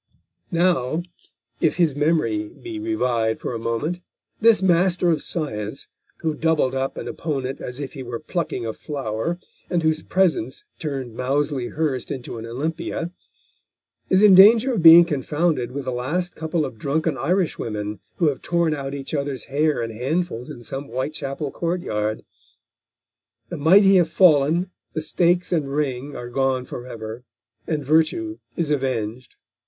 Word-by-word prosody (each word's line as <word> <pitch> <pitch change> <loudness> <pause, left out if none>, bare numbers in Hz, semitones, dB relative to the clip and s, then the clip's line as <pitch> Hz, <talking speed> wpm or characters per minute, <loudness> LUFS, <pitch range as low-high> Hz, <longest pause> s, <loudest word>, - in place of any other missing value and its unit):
Now, 170 -3 +1 0.6
if 160 - +2
his 165 -6 +2
memory 145 -9 +1
be 340 -2 -8
revived 120 - 0
for - - -4
a 115 - -3
moment, 115 +10 -2 0.4
this 225 -2 +6
master 180 -1 +3
of 160 - 0
science, 110 -10 -4 0.4
who 160 -1 +1
doubled 150 -4 +1
up 135 0 -2
an - - -5
opponent 135 -4 -3
as 125 +2 -6
if 140 -3 -5
he 135 - -7
were 120 -2 -5
plucking 155 -7 -3
a 110 - -3
flower, 140 +3 -3 0.3
and 175 -2 0
whose 160 0 +1
presence 190 - 0 0.2
turned 135 -7 -4
Moulsey 135 0 0
Hurst 150 -5 -2
into 120 -3 -5
an 115 - -7
Olympia, 165 +6 -3 1.0
is 190 +2 +4
in 205 -2 +8
danger 225 +7 +7
of 215 - 0
being 165 +1 +10
confounded 150 -3 0
with 140 0 -5
the 130 - -2
last 155 +9 -2
couple 160 0 -1
of 120 -5 -8
drunken 155 +3 0
Irishwomen 120 - -1 0.2
who 170 -5 +2
have 140 - -4
torn 170 -2 +1
out 140 -1 -4
each 135 +1 -7
other's 140 -4 -2
hair 150 -2 0
in 115 - -4
handfuls 125 +2 -2
in 120 - -9
some 135 +4 -5
Whitechapel 140 +2 -4
courtyard. 110 -12 -2 1.3
The - - -5
mighty 195 +6 +6
have 170 -3 +3
fallen, 165 +1 +4 0.2
the 155 - -2
stakes 175 +2 +2
and 155 -6 0
ring 140 -1 -2
are 120 0 -7
gone 130 0 0
forever, 115 -2 -7 0.4
and 150 -3 -2
Virtue 160 - +1 0.2
is 165 -4 -1
avenged. 130 -4 -2
150 Hz, 150 wpm, -23 LUFS, 125-170 Hz, 1.3 s, being